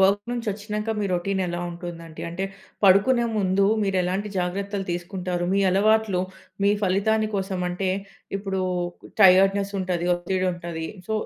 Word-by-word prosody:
Work 195 +2 +4
నుంచి 240 -2 -4
వచ్చినాక, 210 +1 -4
మీ - - 0
routine 190 +2 0
ఎలా 175 0 -3
ఉంటుంది? 170 -1 -7 0.3
అంటే, 185 +3 -3 0.4
పడుకునే 220 +6 +5
ముందు, 195 0 +2 0.2
మీరు 195 -1 0
ఎలాంటి 190 +4 -1
జాగ్రత్తలు 195 +2 -2
తీసుకుంటారు? 175 0 -3
మీ 200 - +3
అలవాట్లు, 210 -1 +3 0.4
మీ 200 - +5
ఫలితాన్ని 215 +3 +2
కోసం 190 -1 -2
అంటే, 180 +2 -2 0.5
ఇప్పుడు 195 -1 -2 0.6
టైర్డ్‌నెస్ 195 +1 +6
ఉంటది, 180 -2 -1
ఒత్తిడి 185 +1 -1
ఉంటది. 170 -2 -5 0.2
సో, - - -1
190 Hz, 140 wpm, -24 LUFS, 180-200 Hz, 0.6 s, టైర్డ్‌నెస్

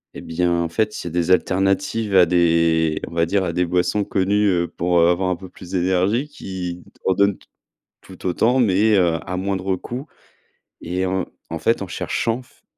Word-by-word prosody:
et - - -7
bien, 85 +1 -1
en 85 - -3
fait, 105 +6 0
c'est 85 - -6
des 85 0 -1
alternatives 95 - +1
à 90 -2 +7
des, 85 -2 +2
on - - -10
va 85 0 +1
dire, 95 +1 +1
à 85 -2 -2
des 90 +1 +1
boissons 90 +4 +1
connues, 100 +2 +1
heu, 85 -2 +1
pour 85 0 0
heu, 85 - +5
avoir 90 +1 +1
un 90 - 0
peu 95 +1 -11
plus 90 0 -13
d'énergie, 95 +8 +1
qui 90 -9 -6 0.2
en 95 - +3
donnent 100 0 +2
t - - -23 0.6
tout 95 -1 -14
autant, 115 +8 +2
mais, 105 -1 +3
heu, 85 -3 +3
à 90 - -3
moindre 95 0 -1
coût. 125 - -7 0.7
Et 90 +2 -2
en 95 0 -1 0.2
en 80 - -3
fait, 115 +1 +1
en - - -4
cherchant 115 +6 -2
f 130 - -26
95 Hz, 195 wpm, -21 LUFS, 85-100 Hz, 0.7 s, à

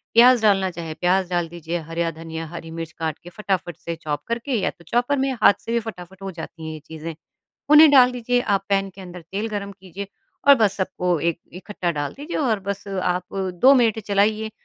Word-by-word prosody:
प्याज़ 245 0 +7
डालना 195 -3 +3
चाहे 165 -2 -6
प्याज़ 180 +2 +1
डाल 175 -1 0
दीजिए, 170 0 -4
हरया 165 0 -1
धनिया, 165 0 -7
हरी 165 0 -8
मिर्च 165 -1 -6
काट 160 -1 -4
के 175 - -10
फटाफट 190 -5 -3
से 170 - -5
चॉप 150 -3 -4
करके 235 +4 -3
या - - +1
तो 170 - -14
चॉपर 245 +7 +1
में 270 0 +1
हाथ - - +8
से - - -7
भी 235 - +2
फटाफट 190 -4 -9
हो 195 -1 -5
जाती 160 -1 -9
हैं 160 - -4
ये 155 - -8
चीज़ें। 160 0 -7 0.6
उन्हें 300 0 +9
डाल 255 -3 +7
दीजिए, 245 0 0
आप 200 -4 0
पैन 195 0 +1
के 190 - -14
अंदर 180 -1 -9
तेल 210 +3 -2
गरम 200 -1 -4
कीजिए 190 0 -9 0.4
और 280 - +11
बस 215 -6 +2
सबको 180 -3 -1
एक 170 +1 -1
इकट्ठा 180 0 -4
डाल 145 -2 -3
दीजिए 295 +5 -6
और 230 -8 +1
बस 200 +1 -5
आप 180 -2 -2 0.3
2 270 +2 +8
मिनट 230 -4 +3
चलाइए 215 +1 +1
190 Hz, 215 wpm, -22 LUFS, 170-220 Hz, 0.6 s, और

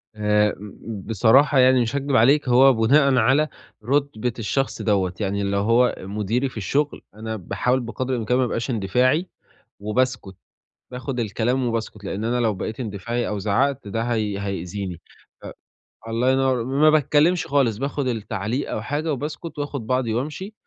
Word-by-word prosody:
آمم، 105 0 +2
ب 105 0 -9
بصراحة 130 +6 +4
يعني 130 0 +5
مش 120 +4 -2
هاكدب 140 -1 -1
عليك 135 +3 +4
هو 130 +2 +6
بناءً 135 +4 +4
على 130 +6 +3 0.4
رُتبة 130 -4 0
الشخص 135 +5 -1
دَوَّة، 95 -4 +1
يعني 100 0 -1
لو 100 0 0
هو 115 +4 +3
مديري 105 +7 -2
في 115 - -13
الشغل 140 +9 -1
أنا 110 0 -5
باحاول 125 +6 -1
بقَدر 130 +2 -4
الإمكان 125 +1 0
ما 130 - +3
ابقاش 120 +2 -3
اندفاعي 125 - +1 0.5
وباسكت، 105 -2 -1 0.6
باخد 125 0 -4
الكلام 120 +4 0
وباسكت، 110 -3 -4
لأن 100 +3 -4
أنا 120 +1 0
لو 110 -3 +1
بقيت 110 +6 -5
اندفاعي 115 +2 -3
أو 105 -1 -3
زعّقت 120 +4 0
ده 115 +2 -2
هي 110 -4 -1
هيأذيني، 95 -2 -5 0.4
ف - - -9 0.6
الله 115 +3 +1
ينوّر 130 -3 +1
م - - -6
ما 155 - +7
باتكلمش 155 +3 +3
خالص 130 -7 +1
باخد 140 0 -2
التعليق 115 +2 -3
أو 105 - -3
حاجة 150 +6 -2
وباسكت 150 +3 -6
وآخُد 140 -6 -4
بعضي 125 -3 0
وأمشي 155 - -4
120 Hz, 160 wpm, -23 LUFS, 105-135 Hz, 0.6 s, ما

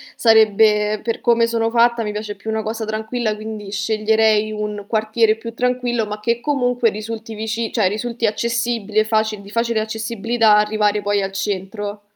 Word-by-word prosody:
sarebbe 215 -1 +4
per 230 0 -3
come 235 -1 +3
sono 230 -1 0
fatta, 235 0 +3
mi 210 - -3
piace 210 0 -4
più 200 +2 -8
una 220 0 -1
cosa 220 +1 -4
tranquilla, 220 +1 -2
quindi 215 -1 -7
sceglierei 215 +1 +2
un 210 -1 -4
quartiere 220 0 +2
più 230 +1 -8
tranquillo, 245 -2 -1
ma 210 0 -5
che 235 +2 -1
comunque 245 -4 +1
risulti 220 +1 -6
vici 220 +1 -3
cioè, 215 -5 +2
risulti 230 +4 -2
accessibile 230 -1 0
faci 215 -1 0
di 200 0 -13
facile 230 0 0
accessibilità 220 0 +1
arrivare 210 0 +1
poi 205 0 +1
al 195 0 -3
centro. 205 +1 -4
220 Hz, 165 wpm, -20 LUFS, 210-230 Hz, -, sarebbe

